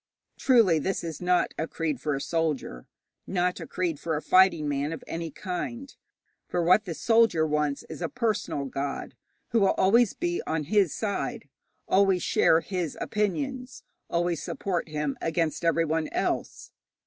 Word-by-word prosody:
Truly 225 - +5
this 190 +5 -2
is 165 -1 -6
not 180 0 +2
a 160 - -1
creed 155 -6 -3
for 150 -1 -1
a 135 - -4
soldier, 150 - -2 0.4
not 180 -1 0
a - - -7
creed 170 -5 -2
for 165 -2 -2
a 150 - -2
fighting 185 -5 +4
man 145 +1 -1
of 165 - -6
any 165 0 -4
kind, 210 - -5 0.5
for 175 - -1
what 185 +5 +4
the 170 -4 -4
soldier 225 -8 +3
wants 150 -2 0
is - - -9
a 165 - -1
personal 220 - -1
god 140 +1 -4 0.4
who 230 - +2
will 195 - +3
always 225 +3 +4
be 345 +1 -1
on 160 -1 -1
his 190 +1 +2
side, 205 -2 -3 0.4
always 195 -2 +3
share 160 - +4
his 180 -5 -3
opinions, 250 +5 -2 0.3
always 170 -2 0
support 180 -4 -3
him 150 -2 -2
against 165 -1 -1
everyone 165 -1 +1
else. - - -3
170 Hz, 160 wpm, -27 LUFS, 155-200 Hz, 0.5 s, Truly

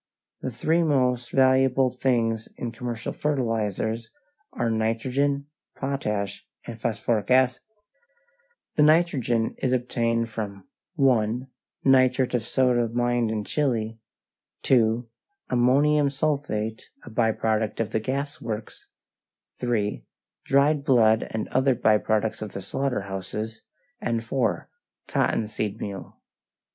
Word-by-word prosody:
The - - -2
three 155 +8 +1
most 125 -6 +1
valuable 130 -1 +4
things 115 -3 0
in 120 - -4
commercial 120 -1 -5
fertilizers 115 -5 -1 0.4
are 120 -1 -1
nitrogen, 130 +6 0 0.3
potash, 105 -8 -3 0.2
and 115 -1 -8
phosphoric 110 -1 -1
acid. 130 -1 +4 1.2
The - - +5
nitrogen 150 -8 +3
is 130 - 0
obtained 115 -2 0
from 100 -4 -6 0.3
(1) 125 -4 +2 0.4
nitrate 130 -1 +4
of 125 - +2
soda 120 0 +1
mined 120 0 +1
in 110 -1 -2
Chile, 115 -4 -1 0.6
(2) 115 -2 +3 0.4
ammonium 140 +4 +4
sulphate, 135 -7 -2
a 120 - -11
by 110 0 +2
product 110 -1 -1
of 115 -1 -1
the 110 - +1
gas 140 +6 -3
works, 110 -1 -6 0.7
(3) 115 -4 -1 0.4
dried 140 +1 +3
blood 115 -6 +4
and 110 -1 -3
other 130 0 +2
by 110 -3 +3
products 110 0 0
of 105 -2 -6
the 95 - -6
slaughter 135 +4 -1
houses, 100 +3 -5 0.4
and 115 -1 -1
(4) 125 +3 -1 0.4
cotton 110 - +1
seed 105 -1 -4
meal. 100 -2 -7
120 Hz, 115 wpm, -25 LUFS, 110-130 Hz, 1.2 s, The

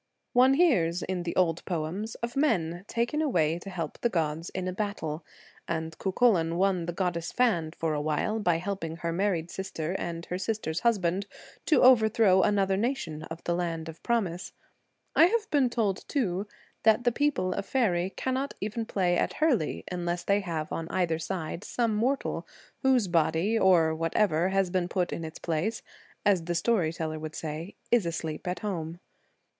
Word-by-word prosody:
One 255 +2 +6
hears 185 - +3
in 185 -1 -2
the 175 -1 -4
old 170 -3 +2
poems 180 +6 -3
of 235 +1 -3
men 180 - +1
taken 235 +6 0
away 170 - +1
to 195 - -9
help 170 -5 -5
the 240 - +2
gods 165 -3 -1
in 185 0 -4
a 185 - -2
battle, 180 -6 -3 0.4
and 160 -1 -3
Cuchullan 190 -5 +2
won 185 -2 +1
the - - -1
goddess 175 -2 -2
Fand 175 -10 +1
for 160 -1 -1
a 150 - -1
while, 155 +9 0
by 175 -5 +2
helping 170 -3 -4
her 165 0 -3
married 175 -3 0
sister 180 -3 -4
and 170 0 -4
her 180 - -4
sister's 195 -6 -2
husband 200 -4 +1 0.4
to 310 - +4
overthrow 220 -6 +6
another 195 -1 +2
nation 205 - -2
of 165 +1 -8
the 170 - 0
Land 165 -2 -2
of 160 0 -9
Promise. 190 -7 -1 0.6
I - - +8
have 440 +2 0
been 275 -4 +3
told, 215 -6 -1
too, 205 - -1 0.3
that 220 +2 +4
the 245 - +3
people 270 -8 +1
of 200 - -4
faery 190 -9 +1
cannot 260 +6 -2
even 215 +2 -3
play 180 -4 +1
at - - 0
hurley 270 - +1
unless 175 -1 -2
they 200 0 +2
have 165 -5 -4
on 165 0 -4
either 175 -4 0
side 170 0 -4
some 230 -3 0
mortal, 255 +6 -1 0.3
whose 260 -6 +3
body, 165 +4 +2
or 180 -6 +4
whatever 165 +2 +1
has 190 -2 +1
been 180 -1 0
put 180 -1 -1
in 165 - -4
its 160 0 -7
place, 170 +7 -2 0.4
as 190 -5 +3
the 175 0 -1
story 175 -2 +2
teller 155 -1 -4
would 155 0 -6
say, 160 +4 -5 0.2
is 235 -7 +4
asleep 160 +1 -4
at 180 - -2
home. 170 -5 -4
180 Hz, 175 wpm, -28 LUFS, 165-220 Hz, 0.6 s, I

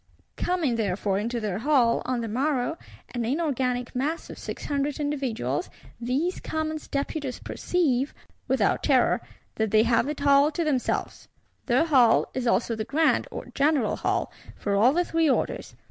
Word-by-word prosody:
Coming 330 -10 0
therefore 195 -2 0
into 235 +3 -2
their 205 -3 -2
Hall, 250 -3 +3
on 250 -2 -1
the 230 - -3
morrow, 265 +5 0 0.4
an 240 -1 -2
inorganic 255 -3 -1
mass 300 +6 -2
of - - -10
Six - - -6
Hundred 285 0 -1
individuals, 260 - -2 0.3
these 270 +10 -1
Commons 315 0 -3
Deputies 280 -1 -3
perceive, 285 -6 0 0.4
without - - +2
terror, - - +3 0.4
that 220 -1 +1
they 215 +1 +5
have 235 +4 +2
it 290 -1 -4
all 280 +1 +6
to 340 - -1
themselves. 280 -6 -1 0.4
Their 260 +5 +3
Hall 255 -8 +4
is 255 -2 -2
also 230 0 +1
the 220 - -3
Grand 310 +7 +2
or - - -7
general 280 -6 +2
Hall - - -1 0.2
for 200 -1 -2
all 225 +6 +5
the 350 +4 +1
Three 325 -2 +2
Orders. - - -1
260 Hz, 160 wpm, -26 LUFS, 230-300 Hz, 0.4 s, all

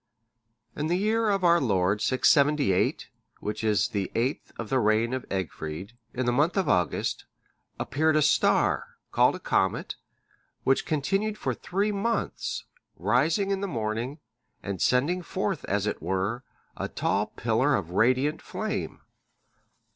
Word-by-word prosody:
(598) - - -6
In 150 - 0
the 180 +5 0
year 225 0 +2
of 195 -2 +1
our 170 -1 +5
Lord 100 -4 +1
678, 140 - +3 0.3
which 105 +1 -4
is 105 -3 +2
the 100 -3 -2
eighth 125 +5 -1
of 115 - -5
the 130 - +2
reign 110 +2 +2
of 130 - -4
Egfrid, 90 0 -4 0.2
in 130 0 -2
the 120 - +2
month 150 +10 +2
of 190 - +1
August, 90 -2 0 0.5
appeared 155 +3 +1
a 155 - +4
star, 145 - +2
called - - +4
a - - -7
comet, - - 0 0.7
which 135 - +2
continued 195 +8 0
for - - -1
three 200 +4 -1
months, 215 +3 -2 0.3
rising 150 - +2
in 195 -1 -1
the 200 - -1
morning, 115 - -3 0.5
and 100 -3 -4
sending 145 +9 +2
forth, 190 0 -2
as 100 0 0
it 105 - -2
were, 95 +6 -1 0.3
a - - -3
tall - - 0
pillar 125 +5 +1
of 85 -4 -3
radiant 130 - +2
flame. - - -4
130 Hz, 145 wpm, -27 LUFS, 105-170 Hz, 0.7 s, our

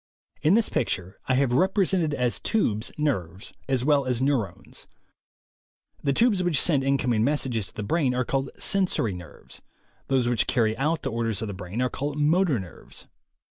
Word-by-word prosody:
In 160 +6 +4
this 230 -1 +3
picture 95 -5 -2
I 130 - +2
have 130 -2 +2
represented 185 -1 +2
as 125 -2 0
tubes 110 - 0
nerves 95 - -2 0.2
as 130 -2 +1
well 145 -2 +3
as 125 -2 0
neu 140 +2 +2
rones. 100 -5 -6 1.1
The 140 - +1
tubes 210 - +3
which 175 -5 +1
send 145 -6 +3
incoming 125 -5 +1
messages 125 -6 0
to - - -14
the 105 - -4
brain 130 +2 +1
are 125 0 0
called 135 +1 -1
"sensory" 185 - +1
nerves; 90 -4 -11 0.5
those 130 -3 +2
which 120 -2 +1
carry 110 -3 +2
out 155 +5 -1
the - - -2
orders 115 -2 -1
of 110 - -4
the - - -4
brain 95 +6 -4
are 125 - +1
called 145 +1 -3
"motor" 155 - +3
nerves. 90 -3 -9
130 Hz, 175 wpm, -26 LUFS, 110-150 Hz, 1.1 s, In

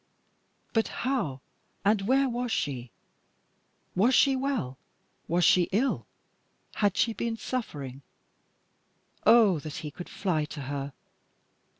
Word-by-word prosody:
But 225 -1 +2 0.2
how 170 - -1 0.4
and 205 0 +4
where 270 +2 +4
was 245 -1 -2
she? 130 - -2 1.1
was 230 +8 +4
she 270 -1 +5
well? 260 - -2 0.5
was 175 0 +2
she 180 -2 +5
ill? 240 +8 0 0.7
Had 205 -2 +1
she 230 - +2
been 230 0 -2
suffering? 145 - -5 1.3
Oh! 215 -8 +6
that 150 +1 -7
he 150 - -5
could 175 +4 -9
fly 175 -6 -1
to 150 -1 -8
her. 140 0 -4
195 Hz, 115 wpm, -28 LUFS, 145-240 Hz, 1.3 s, Oh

